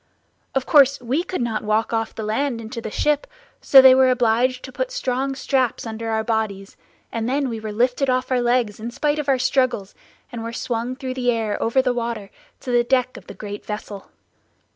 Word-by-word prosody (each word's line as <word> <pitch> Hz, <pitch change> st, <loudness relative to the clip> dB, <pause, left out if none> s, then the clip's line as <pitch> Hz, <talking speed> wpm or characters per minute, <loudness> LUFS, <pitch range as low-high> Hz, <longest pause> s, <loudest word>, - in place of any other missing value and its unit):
Of 265 Hz, -1 st, 0 dB
course 280 Hz, -3 st, +5 dB
we 255 Hz, +6 st, -1 dB
could 365 Hz, -7 st, -3 dB
not 225 Hz, -2 st, -2 dB
walk 215 Hz, +2 st, 0 dB
off 225 Hz, -1 st, -2 dB
the 220 Hz, -, -5 dB
land 235 Hz, +3 st, -1 dB
into 225 Hz, +1 st, -7 dB
the 220 Hz, -, -5 dB
ship; 295 Hz, +6 st, 0 dB, 0.3 s
so 270 Hz, -1 st, +8 dB
they 260 Hz, -1 st, +9 dB
were 260 Hz, 0 st, +5 dB
obliged 250 Hz, +1 st, +1 dB
to 260 Hz, -, -8 dB
put -, -, -3 dB
strong 270 Hz, -, -2 dB
straps 260 Hz, -4 st, 0 dB
under 225 Hz, 0 st, -5 dB
our 220 Hz, 0 st, 0 dB
bodies, 215 Hz, -3 st, -2 dB, 0.4 s
and 230 Hz, +1 st, -2 dB
then 275 Hz, 0 st, 0 dB
we 225 Hz, -2 st, -4 dB
were 215 Hz, -1 st, -5 dB
lifted 250 Hz, +5 st, +1 dB
off 255 Hz, +1 st, 0 dB
our 250 Hz, -1 st, +2 dB
legs 240 Hz, -4 st, +1 dB
in 225 Hz, +2 st, -5 dB
spite 295 Hz, +5 st, -1 dB
of 290 Hz, -2 st, -3 dB
our 270 Hz, -, +4 dB
struggles, 255 Hz, -6 st, 0 dB, 0.4 s
and 235 Hz, -, -6 dB
were 230 Hz, +1 st, -5 dB
swung 235 Hz, +1 st, -3 dB
through 260 Hz, -1 st, -5 dB
the 250 Hz, -1 st, -1 dB
air 225 Hz, -3 st, -2 dB
over 260 Hz, +3 st, +2 dB
the 250 Hz, -, +1 dB
water, 230 Hz, -4 st, -4 dB, 0.3 s
to 255 Hz, -, -5 dB
the 240 Hz, 0 st, +4 dB
deck 255 Hz, 0 st, +1 dB
of -, -, -12 dB
the -, -, -9 dB
great 205 Hz, -1 st, -7 dB
vessel. 210 Hz, -2 st, -7 dB
245 Hz, 210 wpm, -22 LUFS, 225-260 Hz, 0.4 s, they